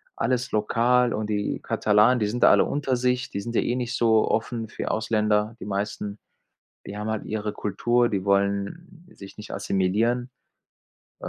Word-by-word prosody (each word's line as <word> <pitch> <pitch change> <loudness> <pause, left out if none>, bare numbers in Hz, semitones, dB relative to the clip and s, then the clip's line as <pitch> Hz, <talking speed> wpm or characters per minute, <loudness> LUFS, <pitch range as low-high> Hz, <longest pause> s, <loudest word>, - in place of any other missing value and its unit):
alles 125 -1 -1
lokal 120 +3 +2
und 110 0 -3
die 105 -1 -1
Katalanen, 110 +4 +3
die 105 - +1
sind 120 +4 -2
da - - +8
alle - - +5
unter 135 -3 -1
sich 125 +1 0
die 100 - -3
sind 115 +3 -6
ja - - +3
eh 120 - -1
nicht 125 0 -3
so 110 -2 +3
offen 115 0 -2
für - - -6
die - - -5
Ausländer, 110 0 0
die - - -7
meisten. 100 +1 -3 0.7
Die 105 - -6
haben 105 +1 -4
halt 110 -1 -3
ihre 105 0 -3
Kultur 120 +4 +1
die 100 -4 -2
wollen 100 - -1
sich 100 -1 -12
nicht 105 - -9
assimilieren, 110 +6 0 0.9
äh, - - -4
110 Hz, 180 wpm, -25 LUFS, 105-120 Hz, 0.9 s, da